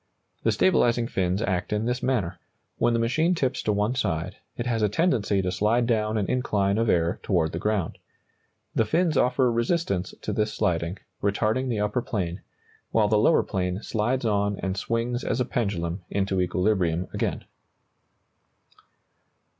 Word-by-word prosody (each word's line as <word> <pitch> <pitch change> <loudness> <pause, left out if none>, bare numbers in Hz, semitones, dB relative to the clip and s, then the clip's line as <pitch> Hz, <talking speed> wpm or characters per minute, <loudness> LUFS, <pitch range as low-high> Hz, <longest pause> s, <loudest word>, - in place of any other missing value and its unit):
The - - +2
stabilizing 120 -10 +3
fins 95 -1 -1
act 95 -5 -1
in 105 +1 0
this 125 +1 -1
manner: 95 -10 -1 0.4
when 120 - +3
the 115 - +2
machine 155 +10 +2
tips 130 -6 0
to 105 - 0
one 105 +3 +1
side, 90 -7 -2 0.2
it 120 - -3
has 115 -2 0
a 105 - +3
tendency 105 - +1
to 90 - -1
slide 110 +5 +2
down 110 -2 +1
an 105 - +1
incline 100 -4 +1
of 115 -1 +1
air 85 0 +2
toward 85 -5 +1
the 85 - -4
ground. 105 -5 -1 0.7
The - - +3
fins 165 +6 +1
offer 125 -1 +3
resistance 115 - -1
to - - -2
this 105 0 0
sliding, 85 +1 0 0.2
retarding 110 +6 +1
the 110 -4 0
upper 105 +4 0
plane, 90 -6 -3 0.5
while 105 -2 +2
the 105 -1 +4
lower 160 +9 +4
plane 90 +1 -2
slides 120 +4 -1
on 100 -2 +1
and 95 -1 -2
swings 115 +4 -1
as - - -1
a 125 - +2
pendulum 95 -6 -2
into 95 -1 0
equilibrium 90 -1 +1
again. - - -2
105 Hz, 160 wpm, -26 LUFS, 95-120 Hz, 0.7 s, the